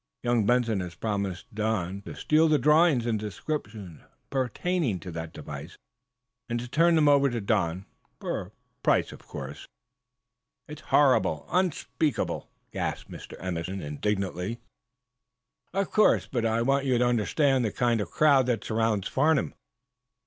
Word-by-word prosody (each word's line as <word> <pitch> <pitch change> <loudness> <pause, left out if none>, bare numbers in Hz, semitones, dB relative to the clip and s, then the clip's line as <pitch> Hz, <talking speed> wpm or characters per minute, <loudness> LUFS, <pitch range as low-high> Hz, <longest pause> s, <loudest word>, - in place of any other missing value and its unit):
Young 120 -4 +2
Benson 120 -4 +2
has 90 -2 -5
promised 100 -3 -3
Don 105 -3 -1
to - - -7
steal 155 +1 +3
the 155 -1 +4
drawings 150 -4 +4
and 115 -3 0
descriptions 105 - -5 0.3
pertaining 135 - -1
to 90 +2 -8
that 80 -1 -6
device, 75 +1 -9 0.7
and 120 0 -1
to 120 - -6
turn 165 +6 +3
them 155 -2 +4
over 140 -1 +5
to 120 -2 -2
Don, 95 -4 0 0.3
for - - -3
a - - -11 0.3
price, - - +2
of - - -14
course!" 70 +1 -8 1.0
"It's 150 0 -9
horrible 110 - +3
unspeakable!" 155 -6 -1 0.2
gasped - - -4
Mr. - - -9
Emerson, 90 +1 -4
indignantly. 95 +6 -2 1.1
"Of 195 +1 -1
course. 215 - +4
But 120 -3 -1
I 115 +1 +1
want 135 +2 +1
you 125 -2 +3
to 125 - +3
understand 125 +3 +2
the 110 - 0
kind 120 -2 +1
of 95 - -4
crowd 140 - +4
that 120 -3 0
surrounds 110 -3 0
Farnum. 150 +1 +2
115 Hz, 145 wpm, -27 LUFS, 95-140 Hz, 1.1 s, over